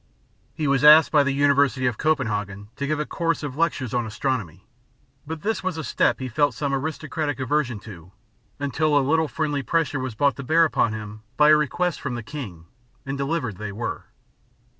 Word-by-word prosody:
He 155 - -2
was 140 0 +2
asked 150 +1 +8
by 150 - +5
the 140 0 +1
University 140 -2 +2
of 125 -3 -1
Copenhagen 105 -9 -1
to 140 - -3
give 155 0 -1
a 150 - -1
course 165 -1 -2
of 140 -3 -5
lectures 150 -7 -1
on 120 -2 0
astronomy; 110 - -3 0.6
but 160 0 -6
this 220 -1 -1
was 185 -3 -2
a 160 - -4
step - - +1
he 130 - -4
felt 145 +4 +1
some 145 -2 -2
aristocratic 150 0 -3
aversion 130 -3 0
to, 90 -5 -12 0.5
until 145 +2 +1
a 140 - +2
little 160 +1 +2
friendly 150 -2 -2
pressure 155 0 0
was 130 -3 -4
brought 140 +3 +2
to 140 - -6
bear 165 +5 +4
upon 115 -7 +1
him 105 0 -7 0.2
by 150 0 +6
a 155 - +8
request 160 +4 -1
from 130 -4 -3
the 120 - -5
king, 110 - -8 0.4
and 135 0 -3
delivered 140 - -2
they 105 0 -5
were. 110 +4 -5
140 Hz, 195 wpm, -24 LUFS, 120-155 Hz, 0.6 s, asked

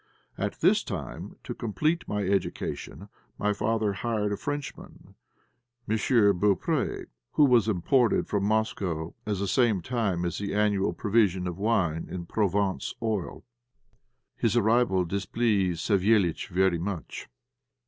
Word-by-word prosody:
At - - -4
this - - +4
time, - - -6
to - - -5
complete 155 - -1
my 105 0 -1
education, 95 -2 -3 0.3
my 105 0 +1
father 105 0 0
hired 105 0 -1
a - - 0
Frenchman, 145 +5 -7 0.7
M. 110 - +1
Beaupré, 105 -4 +2 0.3
who 150 - +5
was 120 -5 +4
imported 115 +5 +2
from 100 -2 -1
Moscow 100 -6 -1
at 105 -2 0
the 100 +1 -2
same 115 -1 +2
time 100 -8 -1
as 85 - -3
the 100 0 -3
annual 105 -3 +1
provision 100 -2 +1
of 90 +1 -4
wine 95 -7 0
and 85 -2 -6
Provence 100 -2 0
oil. 110 -3 -3 0.9
His 115 +1 +1
arrival 110 -4 +3
displeased 100 -2 0
Savéliitch 100 -4 +2
very 95 -1 +2
much. 90 -1 -5
100 Hz, 130 wpm, -27 LUFS, 95-110 Hz, 0.9 s, who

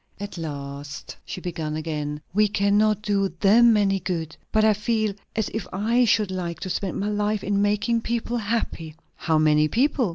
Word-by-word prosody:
At 205 0 -6
last 140 -3 -6
she 185 - -6
began 160 -4 -4
again. 150 -1 -4
"We 210 +2 +4
cannot 205 +1 +2
do 200 -2 0
them 225 +3 +6
any 195 -1 +2
good. 165 -3 -3 0.2
But 215 0 +3
I 215 - +5
feel 215 0 0 0.2
as 220 -3 0
if 220 - -3
I 230 +6 +2
should 210 -3 +2
like 170 -3 -4
to 185 - -3
spend 185 0 -2
my 205 +2 -1
life 210 0 -1
in 200 0 +1
making 210 +3 +1
people 235 +1 -2
happy." 205 -8 -3 0.2
"How 160 -2 +1
many 155 0 +4
people?" 250 - +1
200 Hz, 175 wpm, -24 LUFS, 165-215 Hz, 0.2 s, them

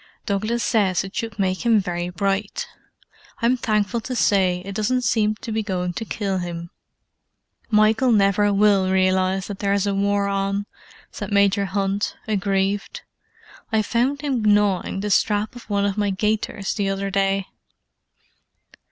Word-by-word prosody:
Douglas 215 +3 -1
says 195 -6 +2
it 195 +1 -9
should 225 -2 -4
make 185 0 -1
him 230 -3 +4
very 175 -2 -3
bright. 200 - -2 0.7
I'm 240 +2 +3
thankful 215 -1 0
to 255 +3 -5
say 185 -5 +2
it 200 - -6
doesn't 250 +5 0
seem 215 -3 +2
to 225 +1 -7
be 220 0 0
going 180 -4 -2
to 225 - -5
kill 195 -3 -2
him." 170 -1 -6 1.0
"Michael 220 +3 +3
never 205 -1 +3
will 200 -2 +3
realize 185 0 +2
that 200 -2 -7
there 200 -1 +1
is 200 0 +1
a 200 - 0
war 200 0 +1
on," 195 0 -1 0.5
said - - -6
Major 200 0 +3
Hunt, 195 +1 -1
aggrieved. 200 - -1 0.7
"I 220 -1 +2
found 255 +6 0
him 275 -5 -1
gnawing 205 -2 +2
the 210 0 -2
strap 210 +3 +1
of 240 -2 -12
one 200 -1 +1
of 200 +1 -1
my 205 -1 +1
gaiters 205 0 -1
the 200 -3 -1
other 195 0 -2
day." 195 0 +1
200 Hz, 155 wpm, -22 LUFS, 195-215 Hz, 1.0 s, him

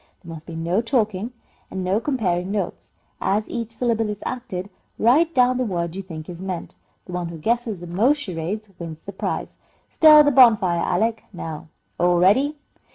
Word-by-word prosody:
"There 165 -1 -8
must 160 -1 -11
be 165 - -7
no 170 +5 0
talking, 225 -3 0 0.4
and 190 -1 -4
no 190 +3 +1
comparing 190 -10 -1
notes. 200 -3 -4 0.3
As 210 +2 0
each 230 -1 -4
syllable 230 -2 0
is 210 -1 -5
acted, 205 -6 -5 0.3
write 300 +9 +3
down 250 0 +4
the - - +2
word 170 -6 -2
you 195 - -4
think 160 -5 -9
is 175 0 -8
meant. 185 -3 -5 0.3
The - - -10
one 180 -1 -3
who 170 0 -7
guesses 225 +1 -1
the - - -7
most 215 - +2
charades 205 - -4
wins 165 -2 -8
the 200 - -8
prize. - - -4 0.3
Stir 305 -1 +8
the 290 - +3
bonfire, 220 -10 +5
Alec. 220 +5 0
Now, 160 -5 -7 0.3
all 175 0 +3
ready!" 260 - +3
200 Hz, 180 wpm, -22 LUFS, 175-235 Hz, 0.4 s, Stir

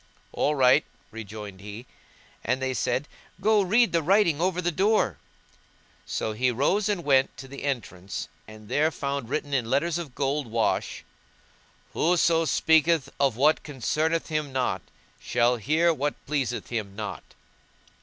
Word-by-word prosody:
"All 150 - 0
right," 130 +2 +5 0.3
rejoined 105 -3 -8
he, 105 +4 -8 0.6
and 125 +3 0
they 130 0 -1
said, 130 +3 -1 0.3
"Go 210 +2 +4
read 220 +5 +3
the 170 - +2
writing 170 -2 +3
over 180 0 +1
the 175 -1 0
door." 195 - +1 0.9
So 110 - -2
he 125 +4 +1
rose 165 - +1
and 195 -4 -1
went 135 -3 +2
to 135 - -9
the 140 +1 -9
entrance 105 -9 -4 0.2
and 110 -1 -13
there 145 +7 +2
found 140 -5 -4
written 145 0 -3
in 120 -4 0
letters 165 +6 +1
of 150 -7 -8
gold 140 0 -1
wash; 115 0 -1 0.9
WHOSO 165 -1 +3
SPEAKETH 160 -2 +3
OF 135 -5 +2
WHAT 150 +4 +3
CONCERNETH 155 +5 -1
HIM 155 -2 -2
NOT, 125 -8 -1 0.4
SHALL 120 +1 +1
HEAR 160 +9 +2
WHAT 145 0 -2
PLEASETH 135 -4 -2
HIM 105 -5 -4
NOT! 105 -1 -7
140 Hz, 145 wpm, -26 LUFS, 120-165 Hz, 0.9 s, right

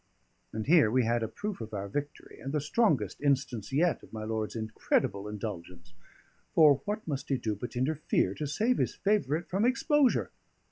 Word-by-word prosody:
And 110 -1 -4
here 155 -7 +5
we 130 +3 +2
had 115 +1 +1
a 110 - -1
proof 205 - -5
of 110 -1 -6
our 100 0 -3
victory, 145 +7 -6
and 135 +3 -5
the 150 - +2
strongest 150 - +1
instance 135 -6 0
yet 165 +5 +2
of - - -16
my 110 -1 -6
lord's 110 0 -3
incredible 110 -2 -1
indulgence; 90 -5 -7 0.6
for 145 -4 +6
what 210 0 -3
must 140 -3 -4
he 135 - +2
do 110 -4 -2
but 120 +6 -7
interfere 130 -7 0
to 150 +7 -4
save 220 - +1
his - - 0
favourite 175 -6 0
from 195 +4 0
exposure! 270 +2 +2
135 Hz, 180 wpm, -30 LUFS, 110-165 Hz, 0.6 s, for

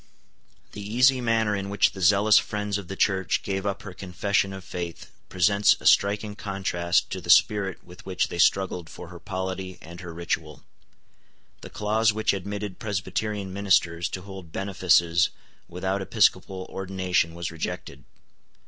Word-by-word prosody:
The 105 - -8
easy 125 +5 +3
manner 115 -3 +1
in 100 0 -4
which 100 +3 +3
the 95 - -9
zealous 100 +4 +5
friends 105 -2 -3
of 95 - -9
the 95 - -6
Church 95 -2 +1
gave 95 0 -2
up 100 - -3
her 100 - -8
confession 95 +2 -1
of 95 -1 -8
faith 85 -1 -6 0.2
presents 100 +3 +4
a - - -14
striking 105 +1 +3
contrast 95 -4 -1
to - - -4
the - - -10
spirit 105 -4 +4
with 90 0 -14
which 95 -2 -1
they 85 - -6
struggled 90 -3 +2
for 85 - -10
her 85 -1 -11
polity 95 0 -5
and 85 +2 -11
her 90 -2 -8
ritual. 80 -3 -4 1.0
The - - -9
clause 110 +1 +1
which 110 -1 +1
admitted 100 0 -5
Presbyterian 100 0 -3
ministers 90 -4 +1
to 95 - -6
hold 95 -4 -10
benefices 85 -3 +2 0.4
without 95 +3 -2
episcopal 95 0 +1
ordination 95 -3 -1
was 85 -1 -4
rejected. 80 -4 -6
95 Hz, 155 wpm, -25 LUFS, 90-100 Hz, 1.0 s, zealous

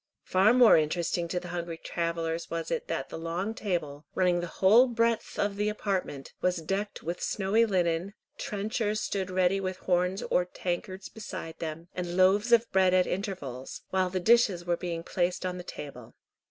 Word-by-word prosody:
Far 190 +4 +4
more 245 -5 +7
interesting 170 +2 0
to 180 +2 -1
the 180 0 -9
hungry 170 -1 -4
travellers 165 0 -3
was 165 -1 -4
it - - -2
that - - -3
the - - -6
long 175 +6 -2
table, 155 -9 -3
running 180 -1 +3
the 175 - -3
whole 215 +9 +5
breadth 230 -1 0
of 205 -1 0
the 210 +1 +1
apartment, 190 -9 -3
was 180 0 +2
decked 195 +6 -3
with 170 +2 -4
snowy 215 +4 +2
linen, 180 0 0 0.2
trenchers 215 +1 -1
stood 195 -3 -2
ready 185 +1 +2
with 185 -1 -3
horns 180 +1 0
or 180 - +2
tankards 185 +2 -4
beside 185 -6 -8
them, 165 +1 -5
and 175 0 -4
loaves 200 +5 +4
of 235 0 +5
bread 185 -1 +4
at 180 -1 +4
intervals, 145 - -5
while 185 -1 +2
the 185 0 -2
dishes 205 -4 +4
were 175 -1 +1
being 170 -1 -4
placed 180 +1 -1
on 180 0 -3
the - - -6
table. 130 -8 -9
185 Hz, 180 wpm, -29 LUFS, 170-200 Hz, 0.2 s, more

